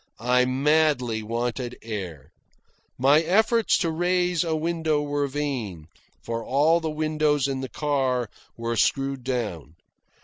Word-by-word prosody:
I 125 0 +4
madly 135 -3 +2
wanted 120 +2 -3
air. 95 - -6 0.7
My 140 +5 +5
efforts 220 +6 +3
to 170 -5 0
raise 175 +1 +1
a 165 -2 -1
window 160 -1 0
were 145 -1 -1
vain, 125 - -4 0.3
for 115 0 -3
all 150 +7 +3
the 160 -1 -3
windows 155 -2 +1
in 135 -1 -3
the 130 - -5
car 130 -3 0 0.3
were 115 0 -2
screwed 135 +3 0
down. 105 - -3
135 Hz, 130 wpm, -25 LUFS, 120-155 Hz, 0.7 s, My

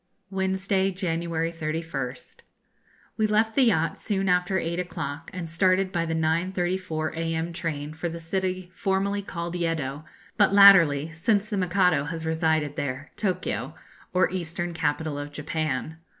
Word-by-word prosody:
Wednesday, 190 0 +1
January 170 -3 -2
31st. 155 -5 -4 0.8
We 215 - +2
left 220 +1 +2
the 265 +1 +4
yacht 165 -8 +1
soon 195 -2 -1
after 180 +1 +2
eight 170 0 -2
o'clock, 165 -3 -5
and 180 -2 -5
started 185 +3 +2
by 170 -3 -1
the 165 - -1
9.34 170 0 -1
a.m. 165 +1 -2
train 155 -4 -3
for 160 +2 -3
the 165 - -6
city 185 +2 -3
formerly 200 0 0
called 170 -3 -5
Yeddo, 155 -5 -2 0.3
but 200 -2 +4
latterly, 165 -7 +7
since 200 +6 0
the 205 - 0
Mikado 180 -5 +2
has 160 +1 -4
resided 160 -2 0
there, 140 +2 -4
Tokio, 190 -4 -2 0.4
or 185 0 +3
eastern 175 -1 -3
capital 155 -1 -1
of 145 0 -6
Japan. 155 0 -3
170 Hz, 140 wpm, -26 LUFS, 160-190 Hz, 0.8 s, latterly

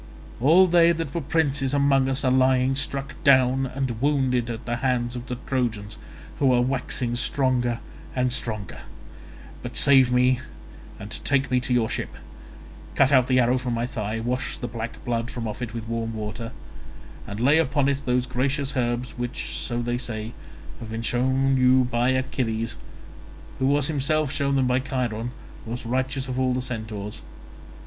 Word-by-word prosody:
All 160 +9 +6
they 170 -1 +5
that 160 -4 -4
were 170 - -1
princes 140 -3 0
among 135 -1 +3
us 135 +1 -1
are 130 - +3
lying 130 0 +3
struck 140 0 -3
down 130 -2 +4
and 130 -3 -3
wounded 130 -4 +1
at 115 0 -5
the 120 0 -2
hands 125 -1 0
of 120 +1 -6
the 125 - -3
Trojans, 115 -5 -2 0.4
who 135 -2 +4
are 120 - +4
waxing 125 -1 -2
stronger 125 -1 +1 0.4
and 125 -1 +1
stronger. 110 -7 -3 0.8
But - - -5
save 135 -3 +6
me 125 0 +3 0.6
and 105 - -7
take 140 -2 +1
me 125 - +3
to 125 - -4
your 115 -2 +2
ship; - - -4 0.8
cut 135 0 +4
out 130 -2 +5
the 130 -1 +3
arrow 125 +1 +3
from 125 -2 -2
my 115 +1 -1
thigh; 110 -3 -3
wash 125 +3 -2
the 120 - -4
black 115 0 -6
blood 115 0 -1
from 120 -3 -4
off 105 +3 -6
it 120 -1 -5
with 115 -1 -5
warm 115 -1 -3
water, 110 +2 -5 0.8
and 100 +1 -6
lay 140 +6 +4
upon 140 -2 +1
it 140 0 0
those 125 -1 +1
gracious 135 +3 -1
herbs 120 0 -2
which, 120 0 -4
so 120 -1 -2
they 120 +1 -1
say, 110 -2 -4 0.5
have 115 - -8
been 115 +1 -4
shown 130 +3 +1
you 130 0 +5
by 120 0 +1
Achilles, 120 -3 -1 0.8
who 130 - +2
was 145 0 +3
himself 155 0 0
shown 140 -1 0
them 135 -1 +2
by 125 0 +2
Chiron, 120 -4 -2 0.4
most 120 +2 -5
righteous 130 +2 -1
of 130 0 -3
all 130 -1 +1
the 130 - -1
centaurs. 110 -4 -6
125 Hz, 175 wpm, -24 LUFS, 120-135 Hz, 0.8 s, All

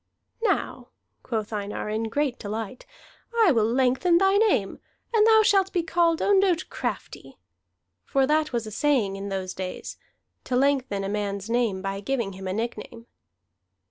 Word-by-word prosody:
"Now," 455 - -1 0.3
quoth 220 -3 -4
Einar 205 0 -4
in 220 +1 -1
great 270 +2 -1
delight, 215 +3 -6 0.6
"I 355 - +5
will 225 -3 +2
lengthen 265 +7 +3
thy 385 +2 +3
name, 405 - +1 0.3
and 440 -1 +5
thou 440 -1 +6
shalt 390 -3 +3
be 350 - 0
called 335 0 +1
Ondott 385 -4 +2
Crafty." - - -5 0.7
For 270 -2 +1
that 305 +2 +1
was 235 -2 -2
a 215 - -7
saying 235 -6 +1
in 195 +1 -6
those 190 -1 -4
days, 185 -1 -6 0.5
to 250 - -2
lengthen 260 -6 +1
a - - -2
man's 200 +1 -3
name 225 -6 0
by 195 0 -3
giving 230 -2 -2
him 190 0 -7
a 185 - -2
nickname. 230 +1 -5
240 Hz, 155 wpm, -25 LUFS, 205-325 Hz, 0.7 s, thou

